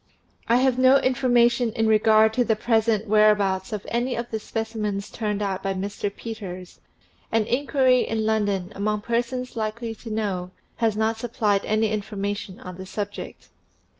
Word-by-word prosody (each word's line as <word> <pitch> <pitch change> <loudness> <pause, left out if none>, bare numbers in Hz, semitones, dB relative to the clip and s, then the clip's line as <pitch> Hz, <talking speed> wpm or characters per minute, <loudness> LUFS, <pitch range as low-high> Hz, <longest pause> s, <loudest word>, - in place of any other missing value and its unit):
I 230 - +4
have 255 0 +3
no 260 +1 +6
information 245 -2 +2
in 225 - 0
regard 220 0 +4
to 245 - +2
the 225 -2 +1
present 220 -1 +1
where 215 0 +5
abouts 195 -2 0
of 210 -2 -4
any 240 +2 0
of 235 0 -5
the 220 - -2
specimens 215 -3 -3
turned 210 -2 -2
out 195 -1 -2
by 195 0 -2
Mr. 200 +2 -3
Peters, 190 -5 -8 0.5
and 225 -1 +2
inquiry 260 0 +2
in 220 -1 -1
London, 205 -4 0
among 210 +1 -1
persons 245 +3 -2
likely 225 +1 -3
to 225 +1 -11
know, 200 -5 -2 0.3
has 225 -3 +1
not 220 +1 +1
supplied 215 -4 0
any 215 0 +1
information 205 -2 -4
on 180 -1 -8
the 190 0 -8
subject. 205 +1 -6
220 Hz, 165 wpm, -24 LUFS, 205-235 Hz, 0.5 s, no